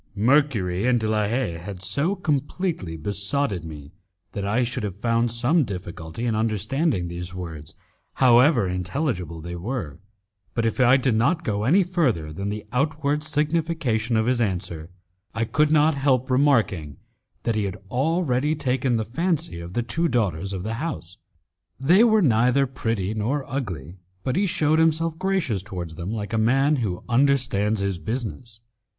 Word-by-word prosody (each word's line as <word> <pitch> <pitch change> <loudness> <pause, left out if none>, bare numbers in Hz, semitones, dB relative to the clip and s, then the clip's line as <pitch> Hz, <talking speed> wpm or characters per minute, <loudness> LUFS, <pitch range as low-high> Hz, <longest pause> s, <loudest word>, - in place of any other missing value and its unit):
Mercury 110 -5 +2
and 125 -1 +3
De 110 - -2
la 105 -1 +1
Haye 105 -8 -1
had 95 +1 -8
so 140 - +1
completely 150 - -2
besotted 100 - 0
me 75 -3 -9 0.4
that 100 - -4
I 110 +5 +1
should 120 0 -3
have 100 -2 -5
found 115 +1 +1
some 125 +8 +2
difficulty 90 -1 -6
in 115 - +1
understanding 110 - 0
these 85 +1 -6
words, 80 -4 -8 0.4
however 125 - +5
intelligible 90 - -3
they 85 +2 -6
were; 90 - -4 0.6
but 115 - 0
if 115 - -1
I 130 +1 +6
did 130 -2 +1
not 160 +10 +2
go 105 -3 -1
any 180 +10 +5
further 130 - 0
than 100 +5 -3
the 105 0 -5
outward 150 +2 0
signification 150 -7 0
of 110 - +2
his 125 0 +1
answer, 90 -6 -3 0.5
I 115 0 0
could 150 +6 +2
not 155 +1 +4
help 135 -2 +1
remarking 115 - +2 0.5
that 115 - 0
he 105 -2 0
had 95 0 -4
already 150 0 +1
taken 130 -3 0
the 110 - -2
fancy 165 - -1
of 85 +1 -8
the 120 - 0
two 165 +8 0
daughters 100 - -1
of 95 -2 -4
the 110 +2 -3
house. 100 - -5 0.6
They 175 - +5
were 220 -3 +4
neither 125 +1 +3
pretty 115 -6 -2
nor 125 +6 -1
ugly, 90 - -5 0.3
but 130 - -1
he 200 +2 +2
shewed 160 -4 +2
himself 160 0 +1
gracious 185 - 0
towards 90 -5 -6
them 85 +5 -5
like 110 0 -4
a 110 - +2
man 135 +6 +3
who 100 -8 -3
understands 120 -5 +2
his 100 -3 -1
business. 115 0 -5
115 Hz, 165 wpm, -24 LUFS, 95-145 Hz, 0.6 s, I